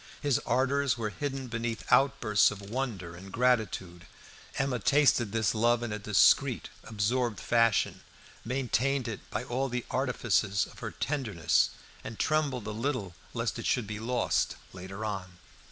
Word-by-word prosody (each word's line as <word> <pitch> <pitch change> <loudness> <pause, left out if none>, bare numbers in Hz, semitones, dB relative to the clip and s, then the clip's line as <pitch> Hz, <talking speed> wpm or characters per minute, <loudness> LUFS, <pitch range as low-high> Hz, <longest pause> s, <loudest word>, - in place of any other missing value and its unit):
His 145 -4 +1
ardours 135 0 +2
were 110 -2 -2
hidden 135 +2 -4
beneath 115 -1 -3
outbursts 125 -5 +4
of 105 - -7
wonder 110 -10 -3
and 95 +2 -11
gratitude. 105 -8 0 0.5
Emma 135 -3 0
tasted 130 -3 +3
this 110 -3 +1
love 120 +2 +2
in 110 -3 -3
a 105 - -3
discreet, 105 0 +3
absorbed 115 0 -1
fashion, 115 -2 +2 0.4
maintained 130 +1 0
it 110 -4 -4
by 105 - -3
all 130 +2 -2
the 125 -1 -3
artifices 120 -6 +1
of - - -14
her - - -4
tenderness, 105 - +1 0.3
and 110 - -7
trembled 145 -7 0
a 110 - -3
little 115 -4 -2 0.2
lest - - -2
it - - -3
should 125 - +1
be 105 0 -5
lost 120 +3 0 0.2
later 95 +3 -7
on. 95 -4 -5
115 Hz, 150 wpm, -29 LUFS, 105-130 Hz, 0.5 s, outbursts